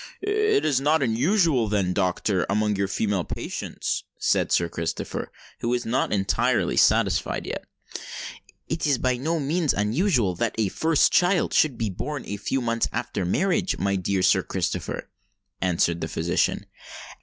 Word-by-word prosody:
"It 425 Hz, +1 st, +1 dB
is 140 Hz, -4 st, +2 dB
not 150 Hz, +1 st, +3 dB
unusual, 135 Hz, -, +2 dB
then, 100 Hz, -3 st, 0 dB
doctor, 95 Hz, 0 st, 0 dB
amongst 105 Hz, 0 st, +1 dB
your 100 Hz, -, +1 dB
female 100 Hz, -2 st, 0 dB
patients?" -, -, -4 dB
said -, -, +1 dB
Sir 85 Hz, -, +3 dB
Christopher, 85 Hz, -1 st, -4 dB, 0.3 s
who 120 Hz, -, -2 dB
was 125 Hz, 0 st, 0 dB
not 125 Hz, +4 st, 0 dB
entirely 100 Hz, -2 st, +1 dB
satisfied -, -, +2 dB
yet. -, -, -5 dB, 1.0 s
"It 160 Hz, -1 st, -1 dB
is 140 Hz, -3 st, +3 dB
by 125 Hz, 0 st, 0 dB
no 160 Hz, +6 st, -1 dB
means 155 Hz, +2 st, 0 dB
unusual 115 Hz, -, +1 dB
that 115 Hz, +3 st, -1 dB
a 110 Hz, -3 st, +1 dB
first 160 Hz, -, +2 dB
child 180 Hz, 0 st, +3 dB
should 140 Hz, -6 st, +3 dB
be 110 Hz, -3 st, -1 dB
born 145 Hz, +9 st, -4 dB
a 100 Hz, -, -4 dB
few 130 Hz, +6 st, -1 dB
months 115 Hz, -1 st, 0 dB
after 115 Hz, -5 st, -3 dB
marriage, 180 Hz, -, +1 dB
my 100 Hz, 0 st, 0 dB
dear 95 Hz, 0 st, 0 dB
Sir -, -, +4 dB
Christopher," -, -, -3 dB, 0.5 s
answered 85 Hz, -2 st, +1 dB
the -, -, -2 dB
physician. -, -, 0 dB
115 Hz, 155 wpm, -25 LUFS, 100-155 Hz, 1.0 s, Sir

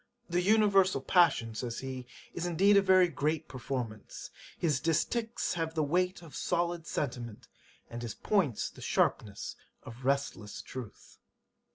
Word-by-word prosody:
"The 175 Hz, 0 st, +1 dB
Universal 195 Hz, -5 st, +4 dB
Passion 140 Hz, -, +3 dB
(says 115 Hz, +1 st, -4 dB
he) 130 Hz, -2 st, -6 dB, 0.3 s
is 175 Hz, 0 st, -2 dB
indeed 195 Hz, +4 st, +4 dB
a 200 Hz, -, +7 dB
very 185 Hz, -1 st, +5 dB
great 155 Hz, 0 st, -1 dB
performance, 125 Hz, -4 st, -5 dB, 0.3 s
his 150 Hz, -6 st, +1 dB
distichs 220 Hz, +9 st, 0 dB
have 165 Hz, -1 st, -2 dB
the 155 Hz, -, +2 dB
weight 180 Hz, +4 st, 0 dB
of 160 Hz, -4 st, -12 dB
solid 170 Hz, -1 st, -1 dB
sentiment, 120 Hz, -6 st, -4 dB, 0.4 s
and 120 Hz, 0 st, -7 dB
his 115 Hz, -3 st, -5 dB
points 175 Hz, -, 0 dB
the -, -, -14 dB
sharpness 100 Hz, -2 st, 0 dB, 0.3 s
of 120 Hz, +3 st, -11 dB
resistless 135 Hz, -6 st, -1 dB
truth."' 125 Hz, -5 st, -10 dB
155 Hz, 140 wpm, -31 LUFS, 125-180 Hz, 0.4 s, a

